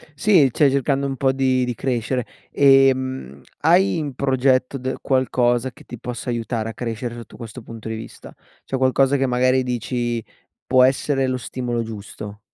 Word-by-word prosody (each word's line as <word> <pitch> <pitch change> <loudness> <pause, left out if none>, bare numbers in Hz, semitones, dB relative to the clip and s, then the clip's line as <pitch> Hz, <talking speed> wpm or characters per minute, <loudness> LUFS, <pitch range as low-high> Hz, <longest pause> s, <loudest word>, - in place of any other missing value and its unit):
Sì, 155 -3 +4
cioè 140 +4 +4
cercando 140 +1 0
un 135 -1 -2
po' 135 0 +2
di 130 -1 +1
di 125 - -2
crescere, 125 0 -1 0.3
ehm, 130 - +3 0.2
hai 175 +4 +4
in 150 -4 -3
progetto 130 0 +1
d 130 0 -3
qualcosa 130 -1 +1
che - - -17
ti 120 - -10
possa 125 +1 -5
aiutare 115 -1 -2
a - - -6
crescere 115 +1 -4
sotto 115 -2 -11
questo 115 +1 -9
punto 115 -1 -10
di 110 - -3
vista, 110 - -10 0.3
cioè 135 - -3
qualcosa 135 +1 +3
che 135 - +1
magari 130 +1 +2
dici: 120 -1 -2 0.4
"Può 130 0 +5
essere 135 +1 +2
lo 130 0 -1
stimolo 120 -1 -3
giusto." 105 -1 -8
130 Hz, 170 wpm, -21 LUFS, 120-135 Hz, 0.4 s, Può